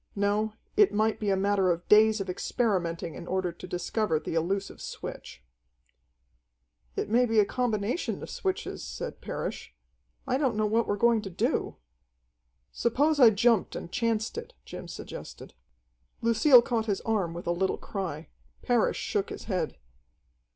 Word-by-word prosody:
No, 205 Hz, +2 st, +1 dB, 0.2 s
it 415 Hz, -2 st, +5 dB
might 215 Hz, +1 st, +1 dB
be 210 Hz, -, -1 dB
a 195 Hz, -, +3 dB
matter 195 Hz, -1 st, +2 dB
of 175 Hz, 0 st, -1 dB
days 215 Hz, +1 st, +6 dB
of 195 Hz, -, -3 dB
experimenting 180 Hz, -4 st, -1 dB
in 170 Hz, -, -9 dB
order 185 Hz, -1 st, -1 dB
to 170 Hz, +2 st, -11 dB
discover 180 Hz, 0 st, -1 dB
the -, -, -5 dB
elusive 190 Hz, +5 st, -2 dB
switch. -, -, -8 dB, 1.5 s
"It -, -, -2 dB
may 240 Hz, +4 st, +3 dB
be 225 Hz, -1 st, +3 dB
a 210 Hz, -, +5 dB
combination 235 Hz, -, -1 dB
of -, -, -7 dB
switches," 380 Hz, -1 st, -3 dB
said -, -, -6 dB
Parrish. -, -, -5 dB, 0.5 s
"I 260 Hz, 0 st, 0 dB
don't 265 Hz, -6 st, +1 dB
know 215 Hz, 0 st, +1 dB
what 225 Hz, +2 st, +1 dB
we're 205 Hz, -, 0 dB
going 230 Hz, +1 st, +3 dB
to 200 Hz, -, -6 dB
do." 175 Hz, -, -1 dB, 1.0 s
"Suppose 285 Hz, -, +1 dB
I 245 Hz, -4 st, +9 dB
jumped 220 Hz, 0 st, +2 dB
and 170 Hz, -, -6 dB
chanced 230 Hz, -, -1 dB
it," 475 Hz, +1 st, -11 dB
Jim -, -, -8 dB
suggested. -, -, -9 dB, 0.7 s
Lucille 235 Hz, +2 st, +6 dB
caught 230 Hz, -3 st, -1 dB
his 200 Hz, -2 st, 0 dB
arm 195 Hz, -7 st, -1 dB
with 175 Hz, -, -7 dB
a 170 Hz, -, +1 dB
little 190 Hz, +2 st, 0 dB
cry. 170 Hz, -6 st, -5 dB, 0.3 s
Parrish 245 Hz, -3 st, +2 dB
shook 200 Hz, -1 st, -1 dB
his -, -, -7 dB
head. 180 Hz, -7 st, -2 dB
210 Hz, 160 wpm, -28 LUFS, 185-235 Hz, 1.5 s, I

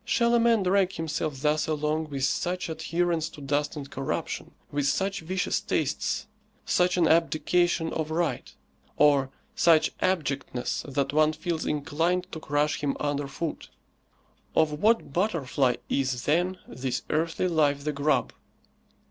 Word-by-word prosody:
Shall 235 Hz, -1 st, +2 dB
a 235 Hz, -, +5 dB
man 230 Hz, -3 st, +3 dB
drag 190 Hz, 0 st, +2 dB
himself 155 Hz, -3 st, -3 dB
thus 150 Hz, +1 st, +2 dB
along 155 Hz, 0 st, -1 dB
with 135 Hz, -2 st, -3 dB
such 180 Hz, +6 st, -1 dB
adherence 160 Hz, 0 st, -1 dB
to -, -, -13 dB
dust 145 Hz, +2 st, -1 dB
and 145 Hz, -2 st, -6 dB
corruption, 135 Hz, 0 st, -4 dB, 0.2 s
with 145 Hz, -1 st, 0 dB
such 195 Hz, +5 st, 0 dB
vicious 180 Hz, +3 st, -1 dB
tastes, -, -, -1 dB, 0.4 s
such 180 Hz, 0 st, +2 dB
an 170 Hz, -2 st, +4 dB
abdication 165 Hz, +1 st, +2 dB
of 160 Hz, -1 st, -2 dB
right, 160 Hz, -5 st, -1 dB, 0.5 s
or 140 Hz, -3 st, +4 dB, 0.3 s
such 165 Hz, -2 st, +4 dB
abjectness 145 Hz, -8 st, -1 dB
that 140 Hz, 0 st, 0 dB
one 155 Hz, +1 st, +4 dB
feels 160 Hz, +1 st, -3 dB
inclined 165 Hz, +5 st, 0 dB
to 160 Hz, -, -5 dB
crush 150 Hz, 0 st, 0 dB
him 140 Hz, -2 st, -1 dB
under 145 Hz, -1 st, -1 dB
foot? 160 Hz, +3 st, -5 dB, 0.9 s
Of 150 Hz, -1 st, +2 dB
what 220 Hz, -9 st, +2 dB
butterfly 145 Hz, -, +1 dB
is, 130 Hz, -2 st, -1 dB
then, 175 Hz, +5 st, +1 dB
this 125 Hz, +2 st, -3 dB
earthly 165 Hz, +3 st, 0 dB
life 145 Hz, -4 st, +2 dB
the 150 Hz, 0 st, -1 dB
grub? 145 Hz, +2 st, +1 dB
155 Hz, 140 wpm, -27 LUFS, 145-175 Hz, 0.9 s, a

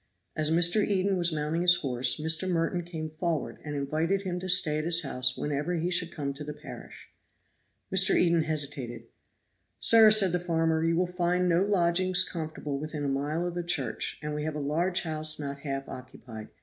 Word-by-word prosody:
As 155 Hz, -1 st, 0 dB
Mr. 175 Hz, +5 st, +3 dB
Eden 195 Hz, -1 st, 0 dB
was 175 Hz, -1 st, +1 dB
mounting 155 Hz, +2 st, -2 dB
his 175 Hz, 0 st, +6 dB
horse, 125 Hz, -5 st, +1 dB
Mr. 160 Hz, +4 st, +2 dB
Merton 175 Hz, +1 st, -1 dB
came 160 Hz, -2 st, -7 dB
forward 170 Hz, -3 st, -3 dB
and 150 Hz, -1 st, -6 dB
invited 160 Hz, +7 st, -1 dB
him 180 Hz, -2 st, -4 dB
to 185 Hz, +1 st, -6 dB
stay 155 Hz, -4 st, +4 dB
at -, -, -3 dB
his 170 Hz, +1 st, +2 dB
house 125 Hz, -2 st, 0 dB
whenever 150 Hz, +4 st, -2 dB
he 170 Hz, +2 st, -2 dB
should 175 Hz, -1 st, +2 dB
come 140 Hz, -4 st, -4 dB
to 145 Hz, +2 st, -9 dB
the 150 Hz, 0 st, -7 dB
parish. -, -, -12 dB, 0.8 s
Mr. 190 Hz, 0 st, +5 dB
Eden 170 Hz, -2 st, +3 dB
hesitated. 145 Hz, -5 st, -4 dB, 0.8 s
"Sir," 225 Hz, -1 st, +6 dB
said 210 Hz, -4 st, +4 dB
the 180 Hz, -, 0 dB
farmer, 165 Hz, -2 st, 0 dB
"you 165 Hz, 0 st, +1 dB
will 180 Hz, +2 st, +1 dB
find 180 Hz, 0 st, -1 dB
no 170 Hz, 0 st, +2 dB
lodgings 185 Hz, -1 st, +2 dB
comfortable 155 Hz, -4 st, -5 dB
within 155 Hz, 0 st, -5 dB
a -, -, -1 dB
mile 145 Hz, +5 st, -2 dB
of 175 Hz, -, -4 dB
the 175 Hz, -, -3 dB
church, 150 Hz, -9 st, -1 dB
and 150 Hz, 0 st, -4 dB
we 150 Hz, 0 st, -4 dB
have 155 Hz, 0 st, -4 dB
a -, -, -4 dB
large 170 Hz, +6 st, 0 dB
house 155 Hz, -1 st, 0 dB
not 140 Hz, -1 st, -6 dB
half 135 Hz, -2 st, -5 dB
occupied. 120 Hz, -3 st, -10 dB
160 Hz, 195 wpm, -27 LUFS, 150-175 Hz, 0.8 s, his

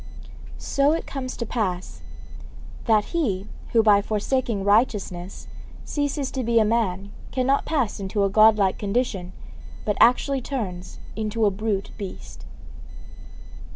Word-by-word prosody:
So 280 Hz, +2 st, +2 dB
it 330 Hz, -, -2 dB
comes 260 Hz, -2 st, -5 dB
to 235 Hz, -, -3 dB
pass 190 Hz, -6 st, -3 dB, 0.8 s
that 215 Hz, -3 st, +3 dB
he 205 Hz, -, 0 dB, 0.3 s
who 225 Hz, -1 st, +4 dB
by 205 Hz, -2 st, +5 dB
forsaking 215 Hz, 0 st, -1 dB
righteousness 200 Hz, -4 st, 0 dB, 0.4 s
ceases 285 Hz, -2 st, -2 dB
to 260 Hz, -, -2 dB
be 230 Hz, 0 st, +1 dB
a 220 Hz, -, +5 dB
man 200 Hz, -3 st, 0 dB, 0.2 s
cannot 270 Hz, +2 st, +1 dB
pass 270 Hz, -11 st, -1 dB
into 200 Hz, +1 st, -1 dB
a 195 Hz, -, +2 dB
Godlike 215 Hz, -2 st, +5 dB
condition, 200 Hz, -4 st, -1 dB, 0.5 s
but 210 Hz, -2 st, 0 dB
actually 260 Hz, +3 st, +4 dB
turns 190 Hz, -9 st, -5 dB, 0.2 s
into 220 Hz, 0 st, 0 dB
a 205 Hz, -, +3 dB
brute 200 Hz, 0 st, -2 dB
beast.' 195 Hz, -2 st, -8 dB
215 Hz, 125 wpm, -24 LUFS, 200-255 Hz, 0.8 s, by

